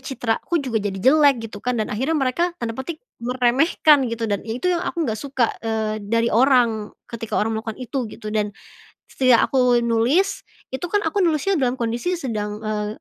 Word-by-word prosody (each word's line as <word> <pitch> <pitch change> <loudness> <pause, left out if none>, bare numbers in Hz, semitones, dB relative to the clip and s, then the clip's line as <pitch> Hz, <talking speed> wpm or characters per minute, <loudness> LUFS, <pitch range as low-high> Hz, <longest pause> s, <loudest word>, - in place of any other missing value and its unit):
citra 245 -4 -2
aku 345 - -2
juga 250 -8 -1
jadi 200 -1 -3
jelek 270 +1 +4
gitu 205 -2 -8
kan 250 0 -1
dan 215 -2 -2
akhirnya 270 +9 0
mereka 335 +6 0
tanda 230 -1 -4
petik 305 - -7 0.2
meremehkan 255 +3 +3
gitu 230 0 -3
dan 205 -2 -1
itu 255 +11 0
yang 345 - 0
aku 335 -2 -2
nggak 220 -1 -2
suka, 265 -5 0
eee, 220 -1 -2
dari 230 +2 0
orang, 235 -4 +3 0.2
ketika 225 -1 -4
orang 220 +1 0
melakukan 220 +1 -5
itu 250 -2 -4
gitu 215 -2 -7
dan, 210 -1 0 0.6
setidak 255 -3 +3
aku 250 -2 +3
nulis 245 - +1 0.2
itu 260 +6 -6
kan 415 - +3
aku 410 - -1
nulisnya 335 +4 +1
dalam 250 -1 +1 0.2
sedang, 245 -13 -2
eee, 210 -1 -2
245 Hz, 180 wpm, -22 LUFS, 220-280 Hz, 0.6 s, jelek